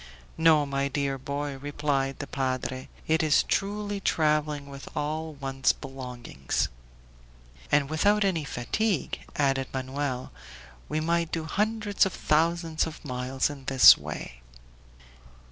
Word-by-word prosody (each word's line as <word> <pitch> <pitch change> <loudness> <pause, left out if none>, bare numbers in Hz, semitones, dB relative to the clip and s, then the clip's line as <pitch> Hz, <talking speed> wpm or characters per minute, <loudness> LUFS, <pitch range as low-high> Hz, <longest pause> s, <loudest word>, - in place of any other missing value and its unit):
"No, 160 -2 +5
my 140 0 -1
dear 140 -1 -1
boy," 140 +1 -4
replied 140 -1 -1
the 145 - -5
padre; 130 -1 -3 0.2
"it 160 +2 +2
is 155 -2 +4
truly 205 0 -1
traveling 150 -4 +1
with 140 0 -9
all 155 +2 -2
one's 135 -1 +1
belongings." 125 - -4 1.0
"And 145 -1 +4
without 205 +8 +3
any 175 -5 +1
fatigue," 165 - -1 0.2
added 135 -2 +1
Manoel; 130 0 -3 0.6
"we 155 - -1
might 170 0 0
do 165 - -2
hundreds 210 +3 +1
of 185 - -6
thousands 165 +1 +1
of 160 0 -10
miles 130 +1 -1
in 140 -2 -10
this 135 -1 +9
way." - - -7
145 Hz, 125 wpm, -27 LUFS, 135-160 Hz, 1.0 s, this